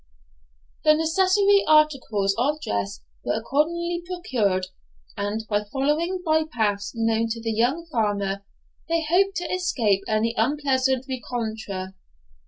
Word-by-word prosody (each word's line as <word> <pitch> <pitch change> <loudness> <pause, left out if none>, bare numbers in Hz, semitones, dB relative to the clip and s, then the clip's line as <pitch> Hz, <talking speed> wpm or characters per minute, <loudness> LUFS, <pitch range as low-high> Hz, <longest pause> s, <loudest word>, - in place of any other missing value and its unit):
The 305 0 +6
necessary 380 +5 +3
articles 270 -10 +3
of 290 +6 0
dress 100 - -3 0.2
were - - 0
accordingly 340 +9 0
procured, 245 - -1 0.5
and, 205 +2 -3
by 205 -1 0
following 315 +7 0
by 315 0 +3
paths 205 -4 -1
known 225 0 +1
to 230 +1 -3
the 225 0 -2
young 250 +10 +1
farmer, 205 -8 -1 0.5
they 330 0 +1
hoped 385 +4 +3
to 355 - -2
escape 230 - +1
any 220 +1 +1
unpleasant 265 0 +1
rencontre. 220 -7 -4
255 Hz, 120 wpm, -24 LUFS, 215-320 Hz, 0.5 s, The